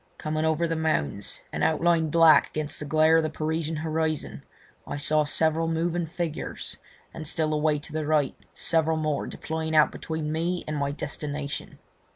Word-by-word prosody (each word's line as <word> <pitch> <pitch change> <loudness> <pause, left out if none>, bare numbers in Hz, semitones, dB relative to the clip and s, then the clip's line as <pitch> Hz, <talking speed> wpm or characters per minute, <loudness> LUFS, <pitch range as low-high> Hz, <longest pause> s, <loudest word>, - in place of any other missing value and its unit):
Coming 155 0 -2
over 160 +1 +1
the 165 - -1
mounds, 160 - -1
and - - -1
outlined 160 0 +2
black 160 -1 +6
against 155 -1 -4
the 150 - -5
glare 155 +2 +5
of 165 - +3
the 155 - 0
Parisian 160 +1 -2
horizon, 155 0 -2 0.5
I 145 - -4
saw 150 +1 +2
several 160 +2 +1
moving 165 +1 0
figures, 170 -1 -4 0.4
and 155 -2 -5
still 155 -1 +1
a - - +1
way 150 0 +2
to 150 +1 -8
the 155 -1 -2
right 150 -3 +2 0.2
several 160 -1 +2
more 155 -2 -1
deploying 160 0 -3
out 155 -1 +6
between 160 -1 -4
me 170 +3 -1
and 155 - -2
my 140 -1 0
destination. 145 -1 -5
155 Hz, 175 wpm, -26 LUFS, 150-160 Hz, 0.5 s, black